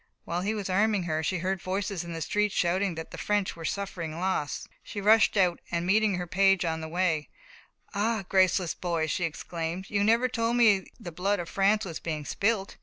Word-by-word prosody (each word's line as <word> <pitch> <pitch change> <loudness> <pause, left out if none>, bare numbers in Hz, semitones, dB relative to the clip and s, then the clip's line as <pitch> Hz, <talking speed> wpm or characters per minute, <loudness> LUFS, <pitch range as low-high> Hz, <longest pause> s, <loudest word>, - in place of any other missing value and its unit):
While 175 +1 -2
he 210 +4 -1
was 205 -3 -3
arming 205 +1 +2
her, 160 -2 -1
she 180 +3 -1
heard 185 +1 -2
voices 190 -1 -2
in 170 - -7
the 165 -1 -5
street 210 +4 +1
shouting 185 +1 +1
that 160 0 -7
the 180 - -8
French 205 +2 0
were 165 - -9
suffering 170 -4 -4
loss. 185 -5 -2
She 205 - -7
rushed 215 +1 +4
out, 180 -3 +3
and 170 0 -1
meeting 210 +1 +3
her 180 0 -3
page 195 0 +3
on 160 -1 -1
the 160 - -5
way: 165 -2 0 0.6
"Ah, 215 +1 0
graceless 185 -2 +3
boy!" 170 -3 -1
she 165 +3 -1
exclaimed, 165 +3 -5
"you 205 -1 +2
never 230 +4 +4
told 230 -1 0
me 210 -5 +4
the 175 - -7
blood 195 +5 0
of 175 -2 -5
France 205 +2 +2
was 165 -4 -5
being 155 -3 -4
spilt." 200 +4 -1
185 Hz, 205 wpm, -28 LUFS, 170-205 Hz, 0.6 s, rushed